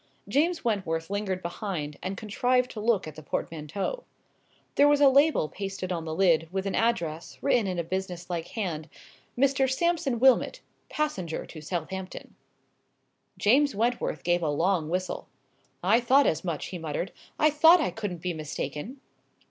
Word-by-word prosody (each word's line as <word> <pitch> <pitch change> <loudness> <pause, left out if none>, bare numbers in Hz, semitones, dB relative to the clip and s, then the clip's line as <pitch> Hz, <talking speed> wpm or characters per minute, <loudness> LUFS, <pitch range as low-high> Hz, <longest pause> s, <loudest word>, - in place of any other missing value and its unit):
James 310 - +1
Wentworth 185 -6 -1
lingered 195 -2 -2
behind, 170 -5 -4
and 190 +1 -4
contrived 250 +5 +1
to 220 - -7
look 215 -5 +1
at 155 - -7
the 155 - -10
portmanteau. 165 - -4 0.7
There 285 - +5
was 290 0 +4
a 285 - +7
label 280 - +4
pasted 195 0 -5
on 165 -2 -3
the 160 0 -4
lid, 165 -4 +3
with 190 +1 -2
an 195 - -1
address, 170 -9 -1
written 245 -7 +3
in 185 -1 -2
a 170 - 0
business 180 0 -4
like 170 -2 -3
hand— 165 -8 -4 0.5
"MR. 270 0 +3
SAMPSON 325 -3 +1
WILMOT, 260 0 +4 0.3
PASSENGER 195 - -2
TO 155 - -10
SOUTHAMPTON." 185 +3 -5 1.0
James 270 +4 +3
Wentworth 235 +3 -1
gave 175 0 +2
a 160 - 0
long 165 +2 +1
whistle. 185 +2 -3 0.6
"I 210 +6 +5
thought 260 +4 +4
as 160 +1 +1
much," 170 -5 -3
he 180 - -6
muttered; 160 +3 -3 0.3
"I 305 0 +4
thought 325 +4 +7
I 310 - 0
couldn't 185 -6 -5
be 180 -1 -1
mistaken!" 155 - -5
190 Hz, 160 wpm, -27 LUFS, 165-250 Hz, 1.0 s, a